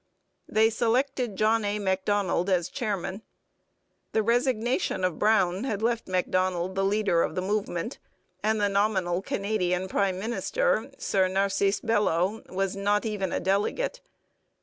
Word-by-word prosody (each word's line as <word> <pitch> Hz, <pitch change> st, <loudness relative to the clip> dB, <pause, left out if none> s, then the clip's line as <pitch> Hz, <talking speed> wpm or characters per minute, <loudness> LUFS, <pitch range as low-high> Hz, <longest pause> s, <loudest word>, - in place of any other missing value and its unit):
They 220 Hz, +1 st, +3 dB
selected 245 Hz, 0 st, 0 dB
John 220 Hz, +2 st, +2 dB
A. 205 Hz, 0 st, -1 dB
Macdonald 190 Hz, -1 st, 0 dB
as 180 Hz, -2 st, +1 dB
chairman. 205 Hz, -6 st, -3 dB, 0.9 s
The 220 Hz, -, +2 dB
resignation 240 Hz, -, +1 dB
of 180 Hz, -3 st, 0 dB
Brown 200 Hz, -2 st, +2 dB
had 220 Hz, -5 st, -2 dB
left 235 Hz, 0 st, 0 dB
Macdonald 185 Hz, 0 st, 0 dB
the 195 Hz, 0 st, 0 dB
leader 195 Hz, -3 st, +2 dB
of -, -, -1 dB
the 185 Hz, -, -1 dB
movement, 205 Hz, +2 st, -2 dB, 0.4 s
and 220 Hz, +1 st, +1 dB
the 205 Hz, -, +3 dB
nominal 195 Hz, -3 st, +1 dB
Canadian 190 Hz, -3 st, -1 dB
prime 190 Hz, -1 st, 0 dB
minister, -, -, 0 dB
Sir 190 Hz, -2 st, +1 dB
Narcisse 195 Hz, +1 st, +1 dB
Belleau, 210 Hz, -2 st, +1 dB
was 195 Hz, +1 st, -1 dB
not 205 Hz, +2 st, +1 dB
even 205 Hz, -4 st, -2 dB
a -, -, 0 dB
delegate. 205 Hz, -, -1 dB
200 Hz, 135 wpm, -27 LUFS, 185-220 Hz, 0.9 s, They